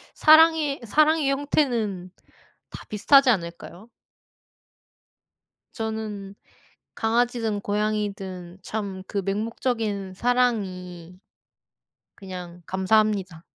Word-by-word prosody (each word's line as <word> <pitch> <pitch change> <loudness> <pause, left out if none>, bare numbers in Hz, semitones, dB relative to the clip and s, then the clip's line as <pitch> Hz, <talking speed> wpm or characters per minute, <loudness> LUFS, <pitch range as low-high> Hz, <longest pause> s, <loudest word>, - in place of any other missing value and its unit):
사랑의, 315 -3 +5
사랑의 305 +4 +3
형태는 235 -10 -1 0.6
다 - - -10
비슷하지 270 +6 +5
않을까요? 175 +1 -3 1.8
저는 215 -3 -5 0.6
강아지든 225 -2 0
고양이든 200 -4 -3
참 200 -3 -5
그 200 -2 -3
맹목적인 210 -1 -2
사랑이 185 -7 -1 1.0
그냥 180 -2 -8
감사합니다. 190 -3 +1
210 Hz, 195 characters per minute, -24 LUFS, 190-245 Hz, 1.8 s, 사랑의